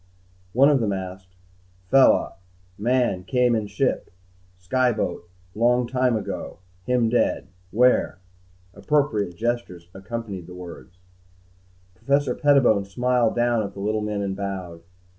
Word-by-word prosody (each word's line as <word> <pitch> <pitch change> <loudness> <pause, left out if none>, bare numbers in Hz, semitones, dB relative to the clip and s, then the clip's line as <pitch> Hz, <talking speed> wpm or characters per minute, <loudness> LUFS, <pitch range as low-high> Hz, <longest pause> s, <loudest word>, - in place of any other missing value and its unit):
One 135 +4 +5
of 145 -2 +3
them 105 -4 0
asked, 95 -1 -7 0.5
"Fella 135 -1 +4 0.4
man 120 -3 0
came 125 +2 +2
in 110 -2 -2
ship - - -1 0.5
sky 125 +7 +1
boat 90 -5 -4 0.2
long 120 +3 +2
time 125 -1 +1
ago. 100 -2 -6 0.3
Him 125 -2 +2
dead? 120 +2 +1 0.2
Where?" 125 -1 +2 0.6
Appropriate 105 -5 0
gestures 110 -6 -3
accompanied 100 -2 -6
the 90 - -10
words. 90 +1 -11 1.0
Professor 140 +7 0
Pettibone 130 -9 +3
smiled 120 +2 +1
down 120 -1 +2
at 100 - -5
the - - -8
little 105 +2 -1
men 105 -1 -2
and 95 -1 -3
bowed. 95 -4 -5
110 Hz, 125 wpm, -23 LUFS, 95-125 Hz, 1.0 s, One